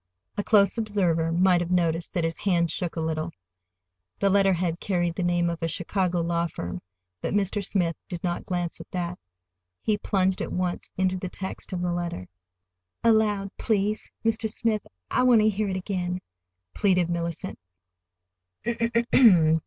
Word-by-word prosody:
A 205 - -1
close 205 +1 +4
observer 180 -7 +1
might 180 +1 +4
have 175 - -3
noticed 170 -2 +1
that 175 -4 0
his 165 0 -2
hand 170 -4 +2
shook 175 0 -3
a - - -2
little. 160 0 -1 0.9
The 195 - +2
letterhead 185 -4 +2
carried 175 -3 0
the 175 - -4
name 175 -1 +2
of 170 -1 -3
a 165 - 0
Chicago 175 +1 0
law 170 0 0
firm, 90 - -6 0.4
but - - -2
Mr. 205 0 0
Smith 175 -4 0
did 175 -2 -5
not 175 -1 -1
glance 175 -2 -2
at - - -13
that. 180 -1 -3 0.6
He 210 -1 0
plunged 190 -2 +1
at - - -3
once 180 -1 -2
into 185 0 +1
the 185 0 -4
text 190 +1 -6
of 180 -2 -2
the 175 -1 0
letter. 170 - -3 0.8
"Aloud, 210 -3 +3
please, 210 0 0 0.2
Mr. 220 -1 +1
Smith. 215 -1 0 0.3
I - - +3
want 245 -3 +6
to 215 - +4
hear 210 0 -1
it 190 - -1
again," 180 -1 -2 0.5
pleaded 180 -4 +2
Mellicent. 170 +1 -3
180 Hz, 160 wpm, -26 LUFS, 170-200 Hz, 0.9 s, want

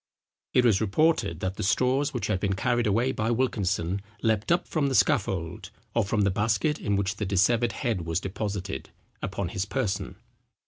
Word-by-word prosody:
It 125 - +5
was 110 -4 +4
reported, 110 - +1
that 95 +1 -2
the - - -3
straws 130 +7 +2
which 120 -7 -3
had 105 -3 0
been 95 0 0
carried 120 +4 +1
away 115 +6 +2
by 110 -2 -1
Wilkinson 100 -6 0 0.2
leaped 110 +2 +1
up 170 - +2
from 150 -3 0
the 135 - 0
scaffold, 95 - +1 0.2
or 115 - +2
from 105 +2 0
the 100 -1 +3
basket 110 +9 +1
in 100 -1 0
which 100 0 -1
the 105 - -2
dissevered 110 +5 +3
head 110 -3 -1
was 80 +1 0
deposited, 100 -5 -4 0.3
upon 95 -2 -3
his 95 0 -2
person. 100 -4 -2
105 Hz, 180 wpm, -27 LUFS, 95-120 Hz, 0.3 s, It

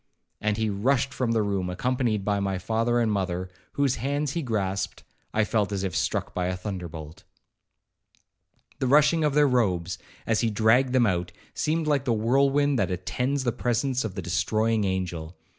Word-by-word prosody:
And 105 -1 0
as - - -4
he 110 - +1
rushed 130 +6 +1
from 120 -3 0
the 110 -2 +2
room, 100 -3 -1
accompanied 115 +1 -1
by 100 -1 +1
my 100 -1 -1
father 115 +5 0
and 115 -2 +2
mother, 90 -2 -2 0.2
whose 140 -3 +1
hands 140 +3 -1
he 170 - -2
grasped, 100 -7 -2 0.3
I 105 - +2
felt 105 -2 0
as 100 -1 -2
if 95 -4 -2
struck - - -1
by 90 -1 -1
a 90 0 -2
thunderbolt. 90 -3 -7 1.6
The 130 - 0
rushing 150 +4 +4
of 150 -2 +1
their 150 -1 +5
robes, 95 -9 0 0.3
as 110 -1 +1
he 115 - +2
dragged 115 +5 +3
them 125 -2 +4
out, 90 -3 0 0.2
seemed 160 +1 0
like 145 -3 +1
the 120 - +2
whirlwind 135 +4 +2
that 100 - +1
attends 125 +10 -1
the 120 - +1
presence 125 +2 0
of 110 -4 -4
the - - -4
destroying 110 -1 +1
angel. 90 -3 -3
110 Hz, 180 wpm, -26 LUFS, 95-130 Hz, 1.6 s, their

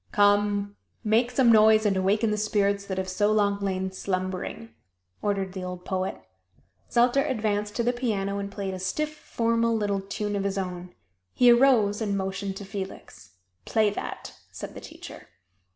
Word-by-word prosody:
"Come, 205 0 +2 0.3
make 225 +3 +3
some 250 -1 +4
noise 215 0 +6
and 200 -2 +3
awaken 205 +4 +2
the - - +1
spirits 200 -1 +1
that 190 -1 -4
have 190 0 -2
so 205 +3 +1
long 200 -1 +2
lain 190 -1 -2
slumbering!" 185 +4 -4 0.5
ordered 195 -2 -1
the 190 -1 -5
old 180 0 -6
poet. 190 0 -2 0.7
Zelter 245 +3 +3
advanced 210 -3 -1
to 235 - 0
the 245 +1 +1
piano 200 -5 -1
and 200 0 -5
played 195 -1 -4
a 185 - -5
stiff, 305 +11 -2
formal 230 -4 0
little 200 -2 -1
tune 205 +1 -3
of 200 - -1
his 200 0 -2
own. 180 -1 -5 0.4
He 245 -1 +6
arose 235 -5 +4
and 200 -2 0
motioned 195 0 -3
to 200 - -7
Felix. 190 - -8 0.3
"Play 215 -2 +2
that!" - - -6 0.2
said - - -8
the - - -9
teacher. - - -11
205 Hz, 170 wpm, -26 LUFS, 195-220 Hz, 0.7 s, noise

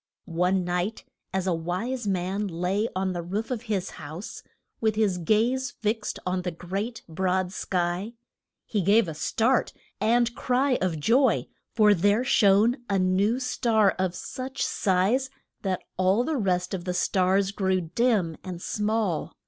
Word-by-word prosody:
] - - -55
One 180 +2 +1
night 180 +5 -2 0.3
as 190 -1 -1
a 185 - +1
wise 185 +9 -3
man 190 +2 -1
lay 185 +5 -1
on 190 0 0
the 175 - -3
roof 200 +8 -4
of 240 -4 -2
his 195 -3 -1
house, 155 +7 -7 0.4
with 220 -2 +1
his 205 -4 +1
gaze 235 +9 +1
fixed 215 -1 -2
on 180 0 0
the 180 - -2
great 195 +7 -5
broad 185 +2 0
sky, 180 +3 -2 0.5
he 210 - -1
gave 200 +3 +4
a 160 - -4
start 230 +10 +1 0.3
and 235 +1 +2
cry 255 +2 +1
of 175 -4 0
joy, 240 - +3 0.3
for 210 -2 +6
there 205 +5 +2
shone 220 0 +4
a 200 - +2
new 190 +6 +2
star 230 -5 +2
of 185 -1 0
such 265 +1 -4
size 205 +8 +1 0.3
that 190 -2 -2
all 190 +5 +3
the 315 +4 -1
rest 185 -6 0
of 180 -2 -4
the 180 -1 -2
stars 190 +2 +2
grew 190 -2 +1
dim 180 -1 +1
and 180 -2 -6
small. 210 -3 -1
195 Hz, 155 wpm, -26 LUFS, 180-225 Hz, 0.5 s, for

